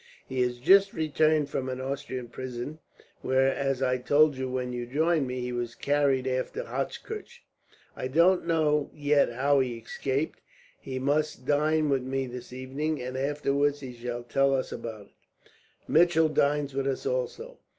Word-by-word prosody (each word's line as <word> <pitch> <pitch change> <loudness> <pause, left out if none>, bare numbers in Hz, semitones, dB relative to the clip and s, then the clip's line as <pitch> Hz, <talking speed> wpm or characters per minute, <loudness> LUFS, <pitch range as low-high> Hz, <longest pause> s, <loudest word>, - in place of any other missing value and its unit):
"He 130 -1 -2
has 125 0 0
just 195 +10 +5
returned 155 -1 +2
from 130 0 -2
an 130 0 -4
Austrian 130 -2 -4
prison 130 +4 -6 0.4
where, 130 +1 +2
as 135 -1 -1
I 125 -1 +1
told 145 +3 +4
you 130 0 -3
when 125 -1 -3
you 120 -1 -4
joined 155 +2 +1
me, 125 0 -3
he 125 0 -3
was 120 -1 -3
carried 140 -2 +1
after 130 -1 -2
Hochkirch. - - -5 0.5
I - - -3
don't 170 +6 +3
know 150 -3 +2
yet 145 -3 +3
how 140 +4 +2
he 125 -3 -1
escaped. 135 +6 -3 0.4
He 130 - -6
must 145 0 0
dine 155 +2 +2
with 135 -2 +2
me 135 +1 -2
this 125 -1 -8
evening, 135 +5 -3
and 125 +1 -5
afterwards 145 +1 0
he 130 -2 -7
shall 120 0 -5
tell 135 +3 +2
us 130 - -2
about 110 -2 -6
it. - - -32 0.4
Mitchell 165 -1 +4
dines 145 -1 +1
with 135 0 -1
us, 135 - -2
also. - - -3
135 Hz, 165 wpm, -28 LUFS, 130-150 Hz, 0.5 s, just